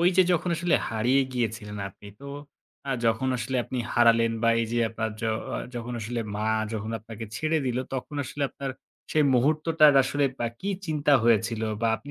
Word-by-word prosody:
ওই 175 Hz, -, +5 dB
যে 185 Hz, -, +8 dB
যখন 175 Hz, +1 st, 0 dB
আসলে 175 Hz, +1 st, +1 dB
হারিয়ে 120 Hz, +5 st, +2 dB
গিয়েছিলেন 115 Hz, -4 st, -3 dB
আপনি 100 Hz, +2 st, -14 dB
তো 140 Hz, -, -9 dB, 0.6 s
আ -, -, 0 dB, 0.2 s
যখন 115 Hz, +4 st, +1 dB
আসলে 125 Hz, +3 st, -2 dB
আপনি 130 Hz, -, -4 dB
হারালেন 115 Hz, -1 st, +4 dB
বা 115 Hz, -, +4 dB
এই 115 Hz, -, 0 dB
যে 120 Hz, -, +1 dB
আপনার 110 Hz, 0 st, -3 dB
য -, -, -10 dB, 0.3 s
অ -, -, -2 dB, 0.2 s
যখন 120 Hz, 0 st, -5 dB
আসলে 115 Hz, +2 st, -3 dB, 0.2 s
মা 105 Hz, +1 st, -2 dB, 0.3 s
যখন 110 Hz, 0 st, -3 dB
আপনাকে 115 Hz, +1 st, -8 dB
ছেড়ে 155 Hz, +3 st, +1 dB
দিল 125 Hz, -1 st, 0 dB, 0.2 s
তখন 135 Hz, +3 st, -5 dB
আসলে 145 Hz, -, -5 dB
আপনার 140 Hz, -1 st, -5 dB, 0.4 s
সেই 155 Hz, -1 st, +4 dB
মুহূর্তটার 155 Hz, +4 st, +4 dB
আসলে 140 Hz, +2 st, 0 dB, 0.2 s
আ -, -, 0 dB
কি 200 Hz, -, -2 dB, 0.2 s
চিন্তা 150 Hz, -2 st, +1 dB
হয়েছিল 115 Hz, 0 st, +2 dB, 0.2 s
বা 115 Hz, -, +2 dB
আপনি 145 Hz, -, -12 dB
120 Hz, 190 wpm, -26 LUFS, 115-145 Hz, 0.6 s, যে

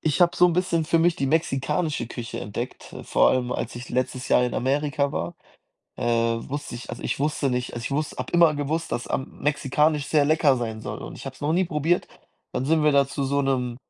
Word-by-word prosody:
ich 155 Hz, 0 st, 0 dB
habe 175 Hz, 0 st, +4 dB
so 180 Hz, -, +6 dB
'n 175 Hz, -, +1 dB
bisschen 175 Hz, -2 st, +1 dB
für 165 Hz, -, +3 dB
mich 170 Hz, +1 st, +3 dB
die 135 Hz, -, -1 dB
mexikanische 150 Hz, +1 st, 0 dB
Küche 115 Hz, -1 st, -6 dB
entdeckt, 120 Hz, +5 st, -6 dB
äh, -, -, -7 dB
vor -, -, +4 dB
allem, 125 Hz, -1 st, 0 dB
als -, -, -3 dB
ich 120 Hz, +2 st, -8 dB
letztes 130 Hz, +1 st, -2 dB
Jahr 125 Hz, -, +4 dB
in 125 Hz, -, -2 dB
Amerika 140 Hz, +2 st, 0 dB
war, 85 Hz, +2 st, -3 dB, 0.6 s
äh, 130 Hz, -, -4 dB
wusste 115 Hz, +4 st, -1 dB
ich 120 Hz, -, -9 dB
also, 120 Hz, -, -7 dB
ich -, -, -2 dB
wusste 145 Hz, 0 st, 0 dB
nicht 125 Hz, 0 st, -2 dB
also, 120 Hz, -, -5 dB
ich -, -, -3 dB
wuss 150 Hz, +2 st, -1 dB
habe -, -, -5 dB
immer 170 Hz, -3 st, +6 dB
gewusst, 150 Hz, +3 st, -2 dB
dass, 120 Hz, -, -3 dB
ähm, 130 Hz, -, -3 dB
mexikanisch 150 Hz, +1 st, +1 dB
sehr 150 Hz, -2 st, +4 dB
lecker 150 Hz, -3 st, +4 dB
sein 110 Hz, -3 st, -4 dB
soll 105 Hz, -1 st, -5 dB
und -, -, -8 dB
ich -, -, -10 dB
habe 135 Hz, -, -5 dB
es -, -, -18 dB
noch 150 Hz, +1 st, 0 dB
nie 185 Hz, +3 st, +3 dB
probiert. 165 Hz, +1 st, 0 dB, 0.5 s
Dann 125 Hz, -, -2 dB
sind 160 Hz, +1 st, +3 dB
wir 150 Hz, -, +5 dB
da 140 Hz, -1 st, +4 dB
zu 140 Hz, -, -2 dB
so 140 Hz, +1 st, +1 dB
'nem 125 Hz, -3 st, 0 dB
140 Hz, 235 wpm, -25 LUFS, 125-155 Hz, 0.6 s, so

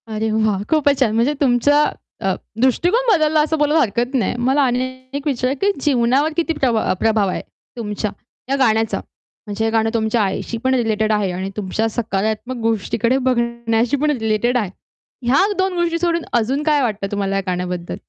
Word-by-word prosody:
अरे 220 Hz, 0 st, -2 dB
वाह! 215 Hz, -2 st, +1 dB
खूपच 290 Hz, -3 st, +2 dB
छान! 240 Hz, -5 st, +2 dB
म्हणजे 240 Hz, +6 st, +2 dB
तुमचा 285 Hz, +3 st, +4 dB, 0.4 s
अ, -, -, +1 dB, 0.3 s
दृष्टिकोन 355 Hz, -, +2 dB
बदलला 310 Hz, -4 st, +3 dB
असं 315 Hz, +1 st, 0 dB
बोलायला 300 Hz, +1 st, +3 dB
हरकत 240 Hz, +2 st, -1 dB
नाही. 240 Hz, -2 st, 0 dB
मला 275 Hz, +2 st, +3 dB
अन 245 Hz, -, 0 dB, 0.4 s
एक 280 Hz, +1 st, -4 dB
विचार 255 Hz, -2 st, 0 dB
की 405 Hz, -, +3 dB
जीवनावर 270 Hz, +3 st, +2 dB
किती 335 Hz, -1 st, +1 dB
प्रभाव 245 Hz, -7 st, 0 dB
अ, -, -, +3 dB
प्रभाव 220 Hz, -3 st, +2 dB
आहे, -, -, -3 dB, 0.4 s
तुमच्या, 210 Hz, -2 st, -3 dB, 0.4 s
या 275 Hz, -, +2 dB
गाण्याचा? 225 Hz, -3 st, +2 dB, 0.5 s
म्हणजे 205 Hz, +2 st, -3 dB
हे -, -, +2 dB
गाणं 225 Hz, 0 st, +2 dB
तुमच्या 225 Hz, 0 st, +1 dB
आईशी 200 Hz, +4 st, -3 dB
पण 260 Hz, 0 st, +2 dB
रिलेटेड 220 Hz, -3 st, +1 dB
आहे 205 Hz, -3 st, +1 dB
आणि 185 Hz, +2 st, -4 dB
तुमच्या 210 Hz, +2 st, -1 dB
सकारात्मक 220 Hz, +2 st, -2 dB
गोष्टीकडे 230 Hz, +3 st, +1 dB
बघण्याशी 235 Hz, 0 st, 0 dB
पण 300 Hz, 0 st, +2 dB
रिलेटेड 235 Hz, -1 st, 0 dB
आहे. 210 Hz, -6 st, -1 dB, 0.6 s
ह्या 275 Hz, +10 st, +4 dB
दोन 380 Hz, 0 st, +1 dB
गोष्टी 335 Hz, -1 st, 0 dB
सोडून 335 Hz, -1 st, 0 dB
अजून 250 Hz, +5 st, +1 dB
काय 300 Hz, -2 st, +2 dB
वाटतं 210 Hz, -5 st, -2 dB
तुम्हाला 200 Hz, -1 st, -1 dB
या 195 Hz, -, +1 dB
गाण्याबद्दल? 180 Hz, -1 st, -3 dB
235 Hz, 175 wpm, -19 LUFS, 215-285 Hz, 0.6 s, तुमचा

